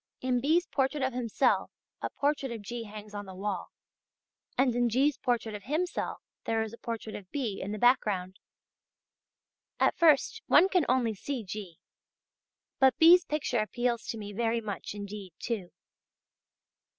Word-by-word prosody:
In 255 -1 0
B's 325 +6 +3
portrait 270 +1 0
of 260 -1 0
himself 245 +1 +1 0.3
a - - -2
portrait 280 -2 -1
of 225 -3 -6
G. 230 +3 -5
hangs 210 0 -10
on 205 -1 -6
the 190 - -9
wall, 195 -1 -3 0.9
and 255 -2 +3
in 245 0 +2
G's. 270 +5 +3
portrait 235 -3 -1
of 205 -2 -8
himself 320 +7 -2 0.3
there 225 0 +1
is 220 0 -7
a 235 - -11
portrait 225 -2 -5
of 190 -3 -8
B. 235 -9 -3
in 195 - -4
the 215 - -3
background. 200 -6 +2 1.4
At - - +3
first 310 -5 +4
one 380 - +6
can 365 -7 +2
only 245 -3 +2
see 250 +4 -4
G.; 190 -4 -7 1.0
but 265 -1 +5
B's. 345 +2 +8
picture 295 -5 -1
appeals 235 +2 -1
to 230 - -3
me 205 -1 -7
very 230 +2 0
much 210 -2 -5
indeed 200 -3 -7
too. 205 -7 -3
235 Hz, 160 wpm, -30 LUFS, 210-265 Hz, 1.4 s, B's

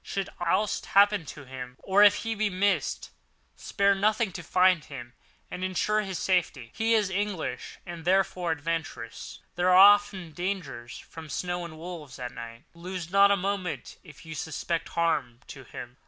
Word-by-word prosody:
Should 195 -1 -3
aught 175 +5 +1
happen 200 -4 +5
to 145 0 -9
him, 125 -1 -8
or 195 +1 +2
if 205 - +5
he 225 - 0
be 215 -1 0
missed, 195 +1 0 0.4
spare 200 -1 +1
nothing 210 +2 +1
to 175 - -7
find 180 0 +3
him 120 -5 -9 0.4
and 180 - -5
ensure 210 +3 +1
his 190 -3 -4
safety. 160 -10 0
He 225 +1 +2
is 210 -3 +1
English 200 -3 -3
and 170 -2 -8
therefore 185 -1 +1
adventurous. 160 +1 -5
There 175 +1 +1
are 180 - +6
often 200 -3 +6
dangers 175 -9 -4
from 160 -1 -11
snow 175 +2 -3
and 160 -2 -10
wolves 160 -6 -8
and 125 -1 -6
night. 115 0 -9
Lose 175 0 -7
not 200 +1 +6
a 200 - +3
moment 195 -2 -3
if 155 -2 -15
you 160 - -7
suspect 160 +2 -3
harm 145 -8 -1
to 135 -2 -10
him. 120 +1 -9
180 Hz, 170 wpm, -27 LUFS, 155-200 Hz, 0.4 s, are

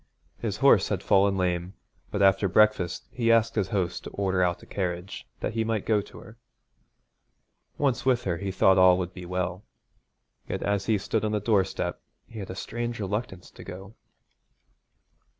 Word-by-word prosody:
His - - -3
horse - - +5
had - - -2
fallen 100 0 +3
lame, 90 0 -1 0.3
but 100 - 0
after 95 +1 +4
breakfast 95 -4 +2
he 115 -2 +1
asked 115 0 +3
his 105 -5 0
host 95 -3 -2
to - - -7
order 95 -2 -1
out 90 -1 0
a - - -11
carriage 90 -1 -4
that - - -2
he 115 0 0
might 110 -2 -2
go 105 -2 +2
to - - -14
her. 110 - -13 1.4
Once 135 -4 0
with 125 -2 +2
her 85 -3 -1
he 100 +2 -4
thought 95 0 +4
all 90 -1 +7
would 90 0 -4
be 90 -2 -9
well. 90 +1 -3 0.9
Yet - - -3
as 100 -1 -1
he 110 - +3
stood 110 +3 -2
on 110 0 -1
the 105 - +1
doorstep 100 -3 0 0.2
he 115 - -10
had 95 - -7
a 95 - -6
strange 120 +3 -4
reluctance 105 -2 -4
to - - -12
go. 95 +3 -9
100 Hz, 180 wpm, -27 LUFS, 90-110 Hz, 1.4 s, all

